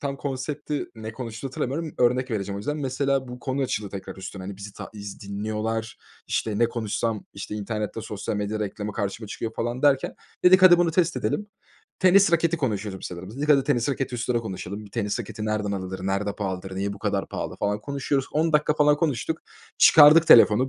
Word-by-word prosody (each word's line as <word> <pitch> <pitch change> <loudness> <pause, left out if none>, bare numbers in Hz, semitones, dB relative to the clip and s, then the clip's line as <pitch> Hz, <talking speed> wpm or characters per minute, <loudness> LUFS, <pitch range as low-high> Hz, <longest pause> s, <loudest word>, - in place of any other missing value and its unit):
tam 140 -3 -3
konsepti, 145 +2 -3
ne 110 0 -7
konuştuğunu 115 +1 -6
hatırlamıyorum, 145 +5 -3
örnek 125 +1 +2
vereceğim 100 -3 -2
o - - -4
yüzden. 145 +9 -3
Mesela 135 -1 -1
bu 125 - -7
konu 135 +1 -1
açıldı 105 -6 -2
tekrar 95 -1 -7
üstüne, 95 0 -7
hani, 95 +1 -6
bizi 100 +1 -9
ta - - -9
iz 100 -2 -8
dinliyorlar, 110 +2 -3 0.3
işte, 105 -2 -1
ne 115 0 +4
konuşsam, 115 -1 -2
işte, 100 +1 -6
internette 105 +1 -3
sosyal 105 -1 -4
medya 105 +1 -2
reklamı 105 0 -4
karşıma 100 +1 -3
çıkıyor 110 +2 -5
falan 120 +3 -3
derken, 140 -2 +3 0.3
dedik, 185 +1 +7
"Hadi 175 -2 +9
bunu 175 -1 +3
test 165 -2 +1
edelim." 130 - -1 0.5
Tenis 185 0 +5
raketi 170 0 +3
konuşuyordum 105 - -3
sanırım. 95 +5 -7
Dedik, 145 +2 -3
"Hadi 140 -3 +5
tenis 130 -4 +1
raketi 135 -2 -2
üstüne 120 0 0
konuşalım." 100 -1 -6
Bir 100 - -14
tenis 105 0 -2
raketi 105 -1 -6
nereden 105 -1 -1
alır, 95 -1 -4
nerede 100 +1 -1
pahalıdır, 95 -2 -4
niye 100 +1 -1
bu 100 - -9
kadar - - -1
pahalı - - -5
falan 105 +1 -1
konuşuyoruz. 140 +1 -2
10 160 +2 +1
dakika 150 0 +3
falan 150 -1 +4
konuştuk. 150 -1 -1 0.4
Çıkardık 155 +2 +8
telefonu, 120 +1 +7
115 Hz, 190 wpm, -25 LUFS, 105-140 Hz, 0.5 s, Hadi